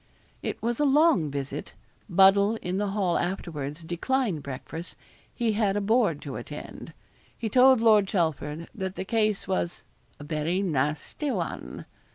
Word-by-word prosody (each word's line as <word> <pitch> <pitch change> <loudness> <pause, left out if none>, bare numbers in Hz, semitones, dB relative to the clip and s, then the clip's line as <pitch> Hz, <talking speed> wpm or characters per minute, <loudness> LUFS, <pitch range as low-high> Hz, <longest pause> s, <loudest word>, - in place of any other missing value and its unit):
It - - -4
was 235 0 -1
a - - +3
long 285 - +4
visit. 140 0 -5 0.3
Buddle 195 +3 +5
in 180 +1 -2
the 205 - 0
hall 195 -3 0
afterwards 165 -4 -4
declined 180 - -1
breakfast 145 +6 -7 0.4
he 235 -2 0
had 205 -2 +1
a - - +2
board 205 - +1
to 140 -3 -5
attend. 145 +5 -8 0.4
He 225 - -3
told 255 +1 +6
Lord 215 -3 +5
Chelford 160 -4 -1
that 190 -4 -4
the - - -4
case 215 -2 0
was 185 -2 -2 0.4
'a - - -8
very 160 +5 -1
nasty 150 - -1
one.' - - -4
190 Hz, 150 wpm, -27 LUFS, 155-220 Hz, 0.4 s, told